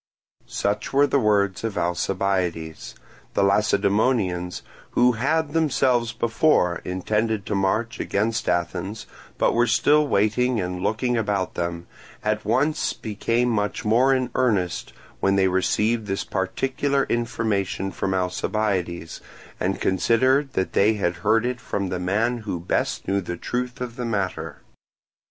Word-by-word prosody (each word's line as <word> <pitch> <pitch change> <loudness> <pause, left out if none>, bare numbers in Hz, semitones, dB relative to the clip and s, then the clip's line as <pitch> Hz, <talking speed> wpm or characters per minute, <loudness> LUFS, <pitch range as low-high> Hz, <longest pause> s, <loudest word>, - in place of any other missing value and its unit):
Such 105 +5 -2
were 140 +1 +5
the 140 - +2
words 100 -4 +1
of 110 -3 -3
Alcibiades. 90 -2 -1 0.4
The 100 - +3
Lacedaemonians, 100 -2 +1 0.3
who 125 +1 +6
had 145 +6 0
themselves 130 -7 +2
before 115 - +2
intended 105 +3 -1
to - - -3
march 100 +4 0
against 110 +2 -1
Athens, 95 +5 -2 0.3
but - - +2
were 120 +1 +3
still 150 +6 +3
waiting 115 +3 +2
and 90 -1 -3
looking 120 +5 0
about 100 -4 -1
them, 85 0 -3 0.4
at 105 0 0
once 150 +9 +1
became 115 +3 -1
much 105 -2 -1
more 120 +5 +4
in 130 -2 +1
earnest 100 -9 0 0.3
when 95 0 +2
they 95 -1 +3
received 105 +4 +1
this 95 0 -2
particular 135 +8 -1
information 110 -5 -1
from 95 +2 -2
Alcibiades, 90 -2 -2 0.4
and - - -1
considered 130 +8 +2
that 95 - -1
they 105 +3 +4
had 90 -4 -1
heard 110 +6 +2
it 125 -1 -2
from 100 -4 -3
the 90 - -2
man 110 +7 0
who 105 -6 -4
best 85 - -2
knew 100 0 +1
the 90 -1 -5
truth 125 +6 -3
of 125 -1 -5
the 125 - -3
matter. 95 -8 -3
105 Hz, 140 wpm, -24 LUFS, 95-120 Hz, 0.4 s, who